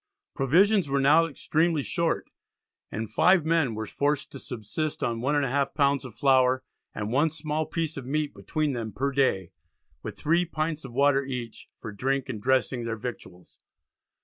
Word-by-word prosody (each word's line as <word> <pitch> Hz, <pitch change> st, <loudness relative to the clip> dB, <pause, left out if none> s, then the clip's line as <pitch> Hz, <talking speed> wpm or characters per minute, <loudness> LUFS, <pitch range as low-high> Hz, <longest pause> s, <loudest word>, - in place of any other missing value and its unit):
Provisions 180 Hz, -, +3 dB
were 140 Hz, 0 st, +1 dB
now 150 Hz, +5 st, +5 dB
extremely 160 Hz, 0 st, 0 dB
short, 170 Hz, +2 st, -1 dB, 0.6 s
and 110 Hz, +1 st, -3 dB
5 180 Hz, -, +4 dB
men 160 Hz, -8 st, +2 dB
were 110 Hz, 0 st, -3 dB
forced 145 Hz, +6 st, -1 dB
to 135 Hz, -, -8 dB
subsist 125 Hz, +7 st, -4 dB
on 115 Hz, -1 st, -1 dB
1 140 Hz, +4 st, +1 dB
1/2 140 Hz, -1 st, 0 dB
lb. 140 Hz, -2 st, +2 dB
of 125 Hz, -, -10 dB
flour, 130 Hz, -1 st, +3 dB, 0.3 s
and 105 Hz, +1 st, -3 dB
1 145 Hz, +6 st, +3 dB
small 155 Hz, 0 st, -3 dB
piece 160 Hz, -1 st, -3 dB
of 130 Hz, -2 st, -6 dB
meat 150 Hz, +1 st, -1 dB
between 145 Hz, -, -2 dB
them 115 Hz, -3 st, -4 dB
per 140 Hz, +7 st, -1 dB
day, 125 Hz, -10 st, +1 dB, 0.5 s
with 105 Hz, -2 st, -7 dB
3 165 Hz, -, +2 dB
pints 155 Hz, -1 st, -3 dB
of 135 Hz, -, -8 dB
water 140 Hz, +1 st, +3 dB
each 125 Hz, -4 st, -6 dB
"for 110 Hz, -, -7 dB
drink 135 Hz, +6 st, -1 dB
and 110 Hz, -5 st, -4 dB
dressing 130 Hz, 0 st, +1 dB
their 115 Hz, -1 st, -3 dB
victuals." 100 Hz, -6 st, -9 dB
140 Hz, 170 wpm, -27 LUFS, 120-155 Hz, 0.6 s, now